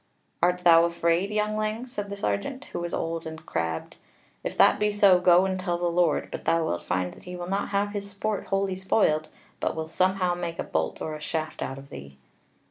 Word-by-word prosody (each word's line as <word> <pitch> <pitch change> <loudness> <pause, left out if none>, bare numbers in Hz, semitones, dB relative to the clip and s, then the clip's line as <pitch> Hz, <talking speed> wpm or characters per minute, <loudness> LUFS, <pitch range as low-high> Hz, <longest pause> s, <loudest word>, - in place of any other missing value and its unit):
"Art 180 +1 +2
thou 165 -1 +7
afraid, 170 +2 +1
youngling?" 215 +2 -1
said 205 -5 -5
the 200 - -5
sergeant, 260 +7 -2
who - - -2
was 170 0 -4
old 165 0 -3
and 160 0 -9
crabbed, 80 - -3 0.5
"if - - -4
that - - +6
be 210 0 +2
so, 200 -3 +5
go 180 +1 +5
and 190 -1 -1
tell 175 -2 -1
the 175 - -2
Lord: 170 -3 +2
but - - -6
thou 165 -1 +2
wilt 85 - -2
find 90 0 -2
that - - -16
he 180 0 -6
will 175 0 -5
not 195 +2 -1
have 200 0 +1
his 200 -1 -4
sport 200 +1 -3
wholly 195 -1 0
spoiled, 185 -5 +1 0.3
but - - -1
will 160 0 -3
somehow 185 +2 +1
make 175 -1 -4
a - - -2
bolt - - -2
or 155 - -3
a 155 - -7
shaft 155 0 -3
out 135 - -3
of 135 +1 -12
thee." 70 0 -10
180 Hz, 215 wpm, -26 LUFS, 160-200 Hz, 0.5 s, thou